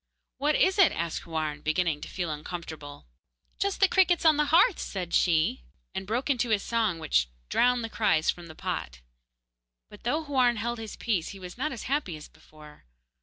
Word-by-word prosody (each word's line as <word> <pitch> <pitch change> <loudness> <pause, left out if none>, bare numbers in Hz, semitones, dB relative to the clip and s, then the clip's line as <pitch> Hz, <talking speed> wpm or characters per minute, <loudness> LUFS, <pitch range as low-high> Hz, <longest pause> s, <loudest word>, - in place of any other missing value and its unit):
'What 295 +2 +2
is 380 +2 +3
it?' 375 - +7
asked 170 0 -3
Houarn, 155 -2 -3
beginning 155 -1 0
to - - -7
feel 175 -4 -3
uncomfortable. 150 - -7 0.5
'Just 400 -1 0
the 390 - +7
crickets 365 -3 +3
on 315 -1 +7
the 300 0 +2
hearth,' 355 +8 +4
said 180 -3 -5
she, 160 - +2 0.3
and 190 - -5
broke 240 +5 -1
into 250 -4 +1
a 215 - +4
song 215 -3 0
which 150 - +1 0.2
drowned 245 -1 +3
the - - -2
cries 210 -8 +2
from 175 -1 -11
the 160 - -11
pot. 60 - -4 0.9
But 210 - -13
though 300 +7 0
Houarn 255 -5 +2
held 235 +2 -3
his 220 -2 -7
peace, 195 -8 -1
he 195 - -9
was 180 -1 -9
not 300 +5 -2
as 235 - -6
happy 265 - -1
as 150 - -11
before. 150 -1 -17
205 Hz, 190 wpm, -28 LUFS, 160-265 Hz, 0.9 s, it